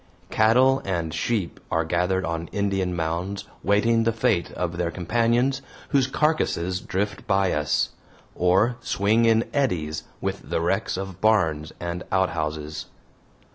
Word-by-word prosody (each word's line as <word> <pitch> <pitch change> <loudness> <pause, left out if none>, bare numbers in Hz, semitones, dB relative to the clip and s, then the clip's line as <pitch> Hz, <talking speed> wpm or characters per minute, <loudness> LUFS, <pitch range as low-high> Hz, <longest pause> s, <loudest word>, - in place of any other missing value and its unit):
Cattle 130 +5 +4
and 85 -4 -2
sheep 100 +2 -1
are 80 0 +1
gathered 90 +3 0
on 85 0 -3
Indian 95 -3 0
mounds 85 +4 -2 0.2
waiting 115 +4 +3
the 115 - +2
fate 100 -6 +1
of 85 -1 -3
their 85 -1 0
companions 120 +8 +1 0.3
whose 135 -3 +3
carcasses 130 - 0
drift 100 +3 -3
by 95 -2 +2
us, 75 0 +1 0.4
or 95 +7 +2
swing 110 +4 +2
in 115 0 +3
eddies 80 - -1
with - - -4
the - - 0
wrecks 95 +4 0
of 95 -2 -6
barns 80 -8 +2
and 85 0 -4
outhouses. 80 -4 -1
95 Hz, 135 wpm, -24 LUFS, 85-115 Hz, 0.4 s, Cattle